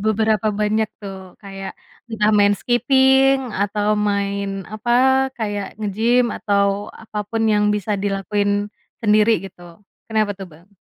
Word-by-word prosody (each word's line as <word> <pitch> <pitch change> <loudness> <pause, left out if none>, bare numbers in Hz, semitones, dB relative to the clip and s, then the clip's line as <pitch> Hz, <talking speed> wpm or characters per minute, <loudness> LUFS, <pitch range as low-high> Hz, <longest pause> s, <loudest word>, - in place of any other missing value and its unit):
beberapa 215 0 +1
banyak 215 +1 +1
tuh, 190 -2 -9
kayak 195 -1 -8 0.3
entah 215 -2 +1
main 205 0 +4
skipping 265 +3 +3 0.2
atau 205 +1 0 0.2
main 200 -1 -2
apa, 230 +3 -2 0.4
kayak 205 -3 -3
nge-gym 220 +4 +1
atau 200 0 0
apa 215 -1 -7
pun 225 +1 -1
yang 210 0 +2
bisa 210 +1 -2
dilakuin 205 +1 -1 0.3
sendiri 215 0 +4
gitu. 180 -2 -12 0.4
Kenapa 215 -2 +1
tuh, 195 0 -9
Bang? 165 +5 -19
205 Hz, 125 wpm, -20 LUFS, 200-220 Hz, 0.4 s, main